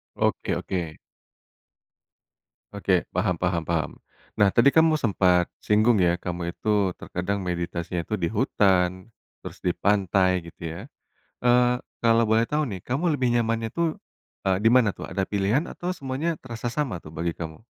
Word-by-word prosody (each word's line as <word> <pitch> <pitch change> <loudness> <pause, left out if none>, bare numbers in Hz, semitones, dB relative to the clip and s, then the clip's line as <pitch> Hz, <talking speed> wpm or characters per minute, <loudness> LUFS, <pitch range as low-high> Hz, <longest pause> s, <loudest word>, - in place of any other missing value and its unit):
Oke - - 0
oke. 85 -4 -4 1.8
Oke, 95 -3 +1
paham 90 -1 +1
paham 90 -2 0
paham. 80 -1 -1 0.5
Nah 105 -1 +6
tadi 120 +7 +5
kamu 160 -1 +5
sempat 90 -5 +3 0.2
singgung 110 +2 +4
ya, 85 0 +2
kamu 85 -1 -4
itu 100 -1 0
terkadang 100 +3 -3
meditasinya 85 -1 -3
itu 110 - -2
di 85 - 0
hutan, 95 -4 +1 0.3
terus - - -9
di 90 - +3
pantai 95 -2 +2
gitu - - -30
ya. - - -7 0.7
Eee, 125 0 +4 0.2
kalau 115 0 +4
boleh 110 +1 +3
tahu 150 +1 +1
nih 100 -8 -5
kamu 135 +7 -3
lebih 130 -3 +1
nyamannya 115 -1 0
tuh, 170 +8 0 0.6
eee, 95 - +3
di - - +7
mana 125 -4 +5
tuh, - - -6
ada 95 +1 -2
pilihan, 105 +8 +1
atau 180 +1 -4
semuanya 140 +3 -2
terasa 120 -1 -6
sama 135 -12 -1
tuh 75 -2 -13
bagi 85 +1 -3
kamu? 80 +3 -7
100 Hz, 155 wpm, -25 LUFS, 90-120 Hz, 1.8 s, di